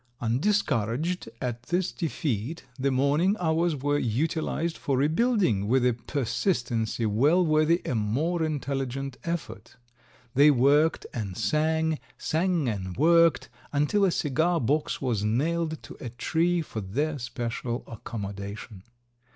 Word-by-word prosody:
Undiscouraged 135 Hz, -, 0 dB
at 120 Hz, -2 st, -3 dB
this 180 Hz, +2 st, 0 dB
defeat, 150 Hz, -, -3 dB, 0.2 s
the 140 Hz, +1 st, +1 dB
morning 145 Hz, +9 st, +2 dB
hours 165 Hz, -1 st, +1 dB
were 145 Hz, +1 st, 0 dB
utilized 160 Hz, +6 st, -1 dB
for 135 Hz, -2 st, -1 dB
rebuilding 155 Hz, -, +2 dB
with 125 Hz, +2 st, +3 dB
a 125 Hz, -, +4 dB
persistency 120 Hz, -, -1 dB
well 145 Hz, -, +3 dB
worthy 155 Hz, +2 st, +3 dB
a -, -, -1 dB
more 135 Hz, +11 st, 0 dB
intelligent 135 Hz, -3 st, -2 dB
effort; 170 Hz, -1 st, -5 dB, 0.6 s
they 140 Hz, +3 st, +6 dB
worked 145 Hz, +4 st, +3 dB
and 100 Hz, -6 st, -4 dB
sang, 160 Hz, 0 st, +1 dB, 0.2 s
sang 165 Hz, -2 st, 0 dB
and 95 Hz, -5 st, -3 dB
worked, 165 Hz, +3 st, +4 dB, 0.2 s
until 150 Hz, +8 st, +2 dB
a 195 Hz, -, +5 dB
cigar 165 Hz, +2 st, +1 dB
box 145 Hz, +3 st, 0 dB
was 115 Hz, -6 st, 0 dB
nailed 160 Hz, +8 st, 0 dB
to -, -, -10 dB
a 125 Hz, -, -5 dB
tree 165 Hz, +8 st, 0 dB
for 110 Hz, -7 st, -6 dB
their 145 Hz, +10 st, -2 dB
special 120 Hz, 0 st, -4 dB
accommodation. 100 Hz, -2 st, -7 dB
145 Hz, 125 wpm, -27 LUFS, 120-165 Hz, 0.6 s, they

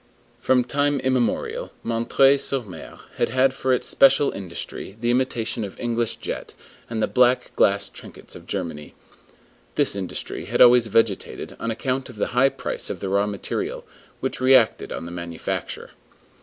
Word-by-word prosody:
From 125 Hz, -1 st, +3 dB
time 145 Hz, +3 st, 0 dB
immemorial, 130 Hz, -2 st, -1 dB, 0.2 s
M. 115 Hz, 0 st, -1 dB, 0.3 s
sur 135 Hz, -, 0 dB
M. 100 Hz, -6 st, -11 dB, 0.2 s
had -, -, +1 dB
had 130 Hz, +2 st, +3 dB
for 130 Hz, -1 st, -1 dB
its 125 Hz, -, +1 dB
special 135 Hz, +1 st, +5 dB
industry 95 Hz, +1 st, -6 dB
the 120 Hz, +1 st, +1 dB
imitation 120 Hz, -2 st, -1 dB
of 100 Hz, -, -8 dB
English 120 Hz, -2 st, -1 dB
jet -, -, -6 dB, 0.3 s
and 110 Hz, -2 st, -2 dB
the -, -, +2 dB
black 125 Hz, 0 st, +2 dB
glass 100 Hz, 0 st, +3 dB
trinkets -, -, -11 dB
of -, -, -12 dB
Germany. 75 Hz, -3 st, -5 dB, 0.8 s
This -, -, +4 dB
industry 95 Hz, -2 st, -4 dB
had -, -, -2 dB
always 120 Hz, -1 st, +7 dB
vegetated, 110 Hz, -2 st, 0 dB
on 115 Hz, -, -3 dB
account 130 Hz, +4 st, -2 dB
of 125 Hz, -, -11 dB
the 105 Hz, -, -1 dB
high 130 Hz, +3 st, +5 dB
price -, -, -3 dB
of -, -, -4 dB
the 95 Hz, -, -4 dB
raw 100 Hz, +1 st, +2 dB
material, 100 Hz, -1 st, -4 dB, 0.4 s
which -, -, -3 dB
reacted 130 Hz, -3 st, +4 dB
on -, -, -5 dB
the 85 Hz, -, -7 dB
manufacture. 85 Hz, -1 st, -5 dB
115 Hz, 160 wpm, -23 LUFS, 100-130 Hz, 0.8 s, always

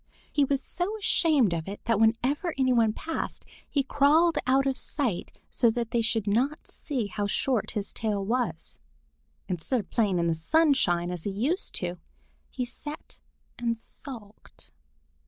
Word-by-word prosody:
He 290 Hz, -, +4 dB
was 275 Hz, 0 st, 0 dB
so 380 Hz, +5 st, -2 dB
ashamed 305 Hz, -, +3 dB
of 165 Hz, 0 st, -3 dB
it 200 Hz, +1 st, -5 dB
that 230 Hz, -2 st, +2 dB
whenever 255 Hz, +9 st, +2 dB
any 260 Hz, -1 st, +3 dB
one 230 Hz, -3 st, +4 dB
passed, 325 Hz, +9 st, -4 dB, 0.2 s
he 280 Hz, -, +1 dB
crawled 300 Hz, +5 st, +4 dB
out 270 Hz, +1 st, +4 dB
of 270 Hz, -1 st, +1 dB
sight 250 Hz, -, -1 dB
so 235 Hz, -, +3 dB
that 235 Hz, 0 st, -2 dB
they 235 Hz, -, +2 dB
should 225 Hz, -2 st, 0 dB
not 255 Hz, +9 st, 0 dB
see 260 Hz, -7 st, -3 dB
how 205 Hz, 0 st, -2 dB
short 240 Hz, +1 st, 0 dB
his 205 Hz, -, -3 dB
tail 205 Hz, -3 st, -2 dB, 0.2 s
is. 165 Hz, -, -6 dB, 0.7 s
Instead 185 Hz, +8 st, 0 dB
of 205 Hz, -, -8 dB
playing 205 Hz, -5 st, +2 dB
in 170 Hz, -, +1 dB
the 165 Hz, -, +2 dB
sunshine 175 Hz, -, +2 dB
as 175 Hz, -3 st, -5 dB
he -, -, 0 dB
used 265 Hz, -, -1 dB
to 180 Hz, -, 0 dB
do, 180 Hz, -, -16 dB, 0.5 s
he 250 Hz, -, -3 dB
sat 295 Hz, +5 st, -8 dB, 0.4 s
and 235 Hz, -1 st, 0 dB
sulked. 225 Hz, -3 st, -10 dB
235 Hz, 165 wpm, -28 LUFS, 205-280 Hz, 0.7 s, He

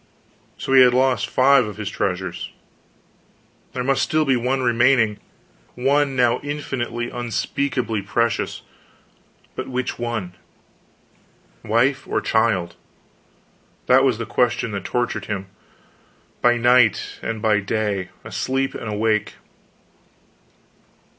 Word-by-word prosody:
So 135 Hz, -, -3 dB
he 130 Hz, -, +8 dB
had 125 Hz, -1 st, +6 dB
lost 130 Hz, -4 st, +2 dB
five 130 Hz, -2 st, +4 dB
of 105 Hz, -, -8 dB
his 105 Hz, -1 st, -5 dB
treasures; 95 Hz, -2 st, -3 dB, 1.2 s
there 125 Hz, -, -2 dB
must 135 Hz, +1 st, +1 dB
still 155 Hz, 0 st, +1 dB
be 135 Hz, -2 st, +3 dB
one 130 Hz, +2 st, 0 dB
remaining 120 Hz, -3 st, +3 dB, 0.6 s
one 140 Hz, +2 st, +1 dB
now 120 Hz, -2 st, +2 dB
infinitely, 130 Hz, -5 st, -4 dB
unspeakably 120 Hz, -1 st, -2 dB
precious, 115 Hz, +4 st, -1 dB, 0.9 s
but -, -, -5 dB
which 125 Hz, -1 st, -3 dB
one? 115 Hz, -7 st, -3 dB, 1.3 s
wife, 130 Hz, +5 st, +1 dB
or -, -, 0 dB
child? 100 Hz, -7 st, +1 dB, 1.1 s
That 130 Hz, +1 st, +5 dB
was 130 Hz, -5 st, +2 dB
the 115 Hz, -, -4 dB
question 115 Hz, +1 st, 0 dB
that 100 Hz, -1 st, -5 dB
tortured 120 Hz, 0 st, -2 dB
him, 95 Hz, -2 st, -5 dB, 0.9 s
by 120 Hz, 0 st, +4 dB
night 120 Hz, -2 st, +3 dB
and 115 Hz, -1 st, -3 dB
by 105 Hz, -1 st, +2 dB
day, 100 Hz, -2 st, -2 dB, 0.2 s
asleep 135 Hz, +1 st, -2 dB
and -, -, -6 dB
awake. 105 Hz, 0 st, 0 dB
120 Hz, 115 wpm, -21 LUFS, 105-130 Hz, 1.3 s, he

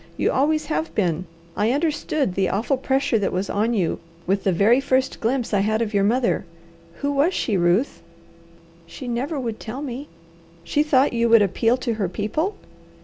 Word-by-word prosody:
You -, -, +1 dB
always 305 Hz, +3 st, +1 dB
have 320 Hz, +1 st, -3 dB
been. 180 Hz, -3 st, 0 dB, 0.3 s
I 215 Hz, +3 st, +1 dB
understood 295 Hz, -, 0 dB
the 190 Hz, 0 st, +1 dB
awful 225 Hz, +8 st, 0 dB
pressure 265 Hz, -3 st, +1 dB
that 200 Hz, -, 0 dB
was 185 Hz, +2 st, -2 dB
on 225 Hz, +3 st, +1 dB
you 180 Hz, -6 st, 0 dB, 0.3 s
with 195 Hz, +2 st, 0 dB
the 195 Hz, -, +3 dB
very 215 Hz, +9 st, +4 dB
first 260 Hz, -1 st, 0 dB
glimpse 240 Hz, 0 st, -1 dB
I 205 Hz, -, +3 dB
had 215 Hz, +2 st, +1 dB
of 225 Hz, -2 st, -2 dB
your 200 Hz, -1 st, +2 dB
mother. 235 Hz, +4 st, +1 dB, 0.6 s
Who 285 Hz, -, 0 dB
was 285 Hz, +6 st, +2 dB
she, 215 Hz, -, 0 dB
Ruth?" 180 Hz, +8 st, +1 dB, 0.9 s
"She 255 Hz, +9 st, -9 dB
never 265 Hz, +6 st, -2 dB
would 230 Hz, -4 st, -4 dB
tell 250 Hz, +6 st, -6 dB
me." 275 Hz, +1 st, -6 dB, 0.6 s
"She 290 Hz, +12 st, +1 dB
thought 285 Hz, -3 st, +3 dB
you 235 Hz, 0 st, +1 dB
would 225 Hz, -2 st, +7 dB
appeal 225 Hz, +5 st, +1 dB
to 250 Hz, -2 st, -2 dB
her 205 Hz, -5 st, -2 dB
people?" 260 Hz, -, -2 dB
235 Hz, 185 wpm, -22 LUFS, 205-275 Hz, 0.9 s, would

